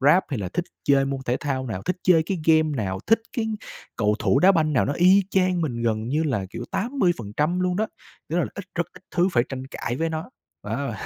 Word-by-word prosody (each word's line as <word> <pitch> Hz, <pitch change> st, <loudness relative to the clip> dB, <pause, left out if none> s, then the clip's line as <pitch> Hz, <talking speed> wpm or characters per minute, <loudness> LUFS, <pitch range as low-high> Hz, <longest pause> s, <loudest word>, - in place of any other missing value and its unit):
rap 150 Hz, +7 st, +5 dB
hay 135 Hz, -, -2 dB
là 95 Hz, -3 st, -3 dB
thích 170 Hz, -, -2 dB, 0.2 s
chơi 140 Hz, -1 st, +4 dB
môn 135 Hz, 0 st, -3 dB
thể 125 Hz, 0 st, 0 dB
thao 130 Hz, -3 st, -2 dB
nào, 105 Hz, -6 st, -4 dB
thích 180 Hz, +1 st, -1 dB
chơi 170 Hz, -3 st, +5 dB
cái 185 Hz, +3 st, -3 dB
game 155 Hz, -2 st, +4 dB
nào, 95 Hz, -4 st, -2 dB
thích 225 Hz, 0 st, +4 dB, 0.2 s
cái 225 Hz, -2 st, 0 dB, 0.5 s
cầu 105 Hz, -1 st, +2 dB
thủ -, -, +2 dB
đá 185 Hz, +6 st, +6 dB
banh 155 Hz, -4 st, +2 dB
nào 130 Hz, -, +3 dB
nó 140 Hz, -, 0 dB
y 185 Hz, +5 st, +5 dB
chang 185 Hz, -2 st, +2 dB
mình 125 Hz, -8 st, -2 dB
gần 110 Hz, -1 st, 0 dB
như 150 Hz, +5 st, +1 dB
là, 110 Hz, -11 st, -1 dB
kiểu, 120 Hz, -, -6 dB
80% 175 Hz, -, 0 dB
luôn 180 Hz, -1 st, +1 dB
đó, 215 Hz, +2 st, +1 dB, 0.4 s
tức 165 Hz, -, 0 dB
là 175 Hz, -, +2 dB
ít 200 Hz, -, -6 dB
rất 175 Hz, -1 st, 0 dB
ít -, -, -15 dB
thứ 180 Hz, +1 st, +2 dB
phải 120 Hz, -, +3 dB
tranh 130 Hz, -1 st, -6 dB
cãi 120 Hz, -2 st, -4 dB
với 165 Hz, +4 st, 0 dB
nó. 160 Hz, +7 st, -5 dB, 0.3 s
Wow, -, -, -3 dB
155 Hz, 240 wpm, -24 LUFS, 125-180 Hz, 0.5 s, đá